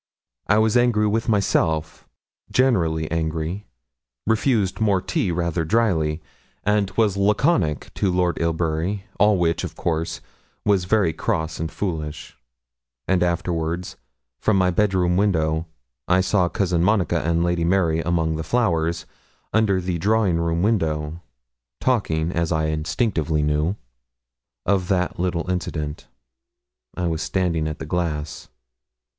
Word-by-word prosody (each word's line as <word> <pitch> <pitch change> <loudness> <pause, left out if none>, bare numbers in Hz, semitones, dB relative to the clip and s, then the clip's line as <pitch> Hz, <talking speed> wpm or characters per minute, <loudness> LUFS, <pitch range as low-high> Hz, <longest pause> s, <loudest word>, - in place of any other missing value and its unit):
I 105 - +4
was 110 0 +3
angry 120 -3 +3
with 110 +3 0
myself 80 -6 0 0.4
generally 85 -12 +2
angry 80 +4 -2 0.6
refused 110 -3 +1
more 100 -3 +3
tea 90 0 -1
rather 85 -1 -1
dryly, 80 -5 +1 0.4
and 105 -1 +2
was 105 -4 +2
laconic 100 - +1
to 95 - 0
Lord 90 -1 +1
Ilbury, 85 +4 -1 0.2
all 105 -1 +5
which, 85 -2 +1
of - - -5
course, 80 -1 -2 0.5
was 100 -3 +2
very 95 -4 +2
cross 80 +1 -2
and 80 0 -3
foolish; 80 -6 -4 0.7
and 95 -2 +2
afterwards, 85 0 -1 0.4
from 110 - +2
my 90 -1 +3
bed 100 +2 +1
room 90 -1 +2
window, 80 -5 +1 0.4
I 90 +1 +4
saw 95 -1 +2
Cousin 90 -3 0
Monica 100 -3 +2
and 85 +3 +1
Lady 85 -1 0
Mary 85 -2 +2
among 80 -1 0
the 80 - -3
flowers, 85 -5 0 0.5
under 110 -4 +3
the 90 -1 -2
drawing 100 -2 +2
room 85 +1 0
window, 80 -6 0 0.6
talking, 85 -10 0
as 85 -1 -1
I 80 -1 +1
instinctively 80 -1 0
knew, 75 +5 +1 0.9
of 95 -2 +1
that 90 -2 0
little 90 -1 -1
incident. 80 -5 -3 0.9
I 90 - -1
was 80 -2 -1
standing 85 -4 0
at 80 0 -4
the - - -6
glass. 80 -4 -3
85 Hz, 130 wpm, -22 LUFS, 80-100 Hz, 0.9 s, all